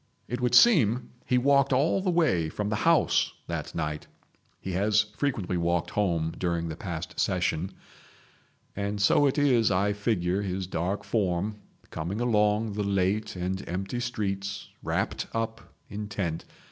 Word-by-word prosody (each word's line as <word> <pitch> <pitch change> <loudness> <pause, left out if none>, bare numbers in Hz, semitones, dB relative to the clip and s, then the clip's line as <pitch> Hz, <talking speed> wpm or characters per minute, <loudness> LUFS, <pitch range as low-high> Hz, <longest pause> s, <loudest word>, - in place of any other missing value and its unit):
It 125 0 -4
would 125 0 +2
seem 125 - +5 0.2
he 125 - +3
walked 140 +1 +3
all 145 +8 +2
the 185 - 0
way 150 - +2
from 105 +5 -3
the 105 - 0
House 165 - +3
that - - -5
night—he 75 +4 -7
has 105 +4 +3
frequently 105 -11 -1
walked 85 0 0
home 85 -5 0
during 85 -2 -1
the 80 - -4
past 85 -2 -6
Session—and 100 +3 -4
so 120 +8 +4
it 135 - 0
is 130 -6 +4
I 100 +1 +2
figure 100 -3 0
his 95 -1 -3
dark 90 +3 -2
form 100 -1 -1 0.3
coming 85 +7 -3
along 105 -2 +2
the 105 0 -2
late 100 +1 0
and 95 +2 -3
empty 95 +7 -3
streets, 100 -4 -3
wrapped - - -2
up, 115 0 -3 0.2
intent. 100 -5 -4
100 Hz, 140 wpm, -27 LUFS, 90-115 Hz, 0.3 s, seem